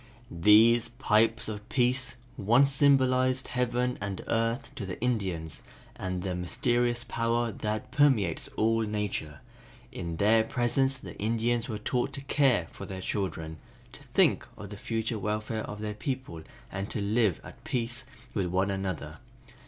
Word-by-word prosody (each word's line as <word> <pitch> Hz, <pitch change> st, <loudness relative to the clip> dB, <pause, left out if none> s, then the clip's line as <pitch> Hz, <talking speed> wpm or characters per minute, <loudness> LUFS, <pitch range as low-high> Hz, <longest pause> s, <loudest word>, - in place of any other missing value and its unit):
"These 110 Hz, +7 st, +5 dB
pipes 115 Hz, -1 st, +2 dB
of 105 Hz, +1 st, -6 dB
peace 125 Hz, 0 st, +1 dB, 0.2 s
once 120 Hz, +7 st, +4 dB
symbolized 130 Hz, -2 st, +3 dB
heaven 125 Hz, 0 st, 0 dB
and 100 Hz, -2 st, -4 dB
earth 115 Hz, +3 st, -1 dB
to 100 Hz, -, -6 dB
the 90 Hz, -, -6 dB
Indians 95 Hz, -10 st, -2 dB, 0.3 s
and 90 Hz, -1 st, -4 dB
the 95 Hz, -2 st, -2 dB
mysterious 120 Hz, +7 st, 0 dB
power 115 Hz, 0 st, 0 dB
that 110 Hz, +1 st, -4 dB
permeates 125 Hz, -, +3 dB
all 115 Hz, +1 st, +2 dB
nature. 105 Hz, -9 st, -3 dB, 0.5 s
In 85 Hz, -1 st, -5 dB
their 110 Hz, +4 st, +4 dB
presence 130 Hz, +3 st, +1 dB
the -, -, -9 dB
Indians 115 Hz, +2 st, 0 dB
were 110 Hz, -, -2 dB
taught 125 Hz, +5 st, -1 dB
to 135 Hz, -, -5 dB
care 135 Hz, -, +2 dB
for -, -, -9 dB
their 95 Hz, -1 st, -6 dB
children, 80 Hz, -5 st, -3 dB, 0.3 s
to -, -, -12 dB
think -, -, +2 dB
of 100 Hz, -, -8 dB
the -, -, -6 dB
future 110 Hz, +2 st, -2 dB
welfare 105 Hz, +2 st, -2 dB
of 105 Hz, -, -7 dB
their 105 Hz, -1 st, -3 dB
people 125 Hz, -, -4 dB, 0.3 s
and 95 Hz, +1 st, -4 dB
to -, -, -2 dB
live 105 Hz, -2 st, +2 dB
at -, -, -13 dB
peace 120 Hz, 0 st, -1 dB, 0.3 s
with 95 Hz, -4 st, 0 dB
one 95 Hz, +2 st, +1 dB
another. 95 Hz, -3 st, -4 dB
110 Hz, 150 wpm, -29 LUFS, 100-120 Hz, 0.5 s, These